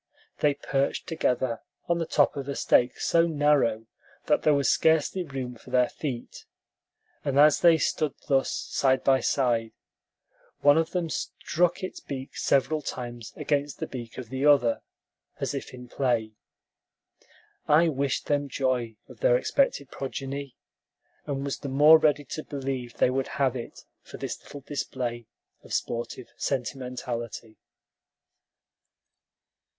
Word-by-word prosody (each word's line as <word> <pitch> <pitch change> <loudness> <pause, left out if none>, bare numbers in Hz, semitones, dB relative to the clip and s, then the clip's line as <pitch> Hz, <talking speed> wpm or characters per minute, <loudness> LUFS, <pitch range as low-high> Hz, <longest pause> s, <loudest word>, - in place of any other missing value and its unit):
They 145 -1 +3
perched 140 -1 -1
together 125 -6 -1 0.3
on 170 0 +1
the 165 - -2
top 145 - +3
of 140 -1 -5
a 140 - -2
stake 125 0 +3
so 170 0 +3
narrow 145 -8 +2 0.4
that - - +2
there 150 -1 +4
was 140 -1 +1
scarcely 160 +3 +3
room 135 -5 -5
for 120 +2 -15
their 125 -1 +3
feet; 130 -6 -6 0.8
and 140 -1 -1
as 150 0 +6
they 170 -2 +6
stood 150 -1 0
thus, 135 -2 +2
side 130 -1 +1
by 135 -1 +4
side, 120 -5 +1 0.9
one 145 +2 +6
of 165 0 0
them 170 -3 -2
struck 175 +5 -1
its 185 - -5
beak 135 -1 -7
several 150 +3 +1
times 120 -4 -6
against 145 -1 -1
the - - -3
beak 120 -3 -8
of 125 -3 -7
the 130 +1 -3
other, 140 -6 +4 0.6
as - - -2
if - - -5
in 125 -1 -10
play. 120 -4 0 1.4
I 155 +3 +5
wished 140 -3 -1
them 145 -1 0
joy 125 -4 -1
of - - -14
their - - +4
expected 270 - 0
progeny, 135 0 -5 0.7
and 140 -1 -2
was 140 - -3
the 140 - -5
more 150 +4 +7
ready 150 -2 +2
to 155 +4 -5
believe 135 -4 -4
they 125 - +3
would 135 0 -1
have 135 -2 +2
it 120 -2 -7 0.2
for - - -11
this - - -5
little 145 - -10
display 125 -4 -4 0.4
of - - -4
sportive 120 +1 -4
sentimentality. 120 -3 -4
135 Hz, 145 wpm, -27 LUFS, 125-150 Hz, 1.4 s, more